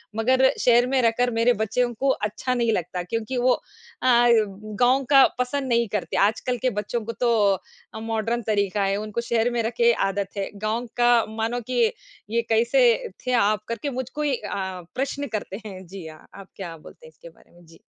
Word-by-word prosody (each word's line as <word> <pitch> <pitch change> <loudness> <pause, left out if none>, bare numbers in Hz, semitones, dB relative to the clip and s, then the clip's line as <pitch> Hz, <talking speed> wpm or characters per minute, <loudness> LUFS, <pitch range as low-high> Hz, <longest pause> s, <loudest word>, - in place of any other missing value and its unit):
मगर 260 +4 +3
शहर 245 0 +4
में 265 0 +2
रहकर 240 +1 +2
मेरे 240 +2 +4
बच्चों 240 +3 0
को 270 +4 -1
अच्छा 250 +1 -1
नहीं 235 -2 +1
लगता 180 -1 -3
क्योंकि 230 +6 -3
वो 250 +1 +3
अ, - - -4 0.5
गाँव 235 +1 +3
का 275 -2 +8
पसंद 265 +2 -1
नहीं 235 -1 +2
करते, - - -2
आजकल 225 +5 +1
के 255 - +2
बच्चों 220 +3 -3
को 230 - -3
तो 240 -1 +3 0.6
अ, - - -6
मॉडर्न 225 +1 -2
तरीका 200 -1 0
है, 195 0 +1
उनको 215 +2 -3
शहर 230 0 +2
में 240 -1 0
रखे 235 +1 +3 0.2
आदत 195 0 -3
है। 195 - -2 0.2
गाँव 225 +3 -1
का 240 -1 +4
मानो 225 +2 -2
कि 255 - +2 0.5
ये, 230 +2 +1
कैसे 235 +1 +3 0.2
थे - - +1
आप? 215 -2 +2
करके 230 +5 -3
मुझको 260 +4 -5
ही 290 -3 +1
अ, 190 -4 -5
प्रश्न 280 +2 -2
करते 205 +1 -7
हैं। 190 -3 -8
जी 185 -2 -9
हाँ, 155 0 -13
आप 195 -1 -11
क्या 170 -4 -7
बोलते 155 - -15
हैं - - -13
इसके 165 +2 -14
बारे 165 - -24
में? 175 0 -20
जी। 165 0 -18
230 Hz, 195 wpm, -24 LUFS, 205-245 Hz, 0.6 s, का